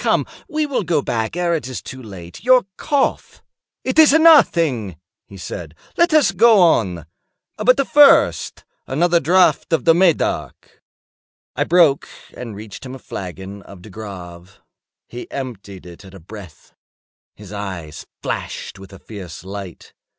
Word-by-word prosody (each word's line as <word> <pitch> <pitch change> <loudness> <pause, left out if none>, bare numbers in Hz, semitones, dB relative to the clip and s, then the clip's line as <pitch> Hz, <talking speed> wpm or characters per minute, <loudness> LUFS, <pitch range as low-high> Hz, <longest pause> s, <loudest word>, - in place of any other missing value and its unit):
Come, - - +1 0.2
we 310 -1 -1
will 280 -5 -2
go 165 -6 0
back 110 +4 -3
ere 175 -1 0
it 150 -7 -3
is 130 - -6
too 130 - -10
late. 95 -6 -11
Your 255 -1 +4
cough—" 285 -3 -2 0.4
"It 260 +4 0
is 310 -3 +7
nothing," 165 - +4 0.3
he 100 - -13
said; 85 -3 -8 0.2
"let 340 0 +3
us 310 -7 +4
go 220 +2 +5
on. 95 - +2 0.5
But 255 +5 +2
first, 290 -1 +4 0.2
another 170 +5 +2
draught 180 +5 +2
of 160 -6 0
the 165 - +6
Medoc." 175 -1 -1 0.7
I - - 0
broke 165 -5 +3 0.3
and 115 -4 -8
reached 105 0 -10
him 130 0 -8
a - - -8
flagon 95 -3 -8
of 95 -2 -14
De 105 - -13
Grave. 90 -3 -10 0.5
He 120 - -9
emptied 105 -9 -8
it 85 +2 -13
at 95 0 -14
a - - -11
breath. 95 0 -13 0.6
His 105 -1 -12
eyes 95 -7 -7 0.2
flashed 100 - -5
with 95 0 -13
a - - -11
fierce 95 -6 -10
light. 95 -2 -9
120 Hz, 150 wpm, -19 LUFS, -, 0.7 s, is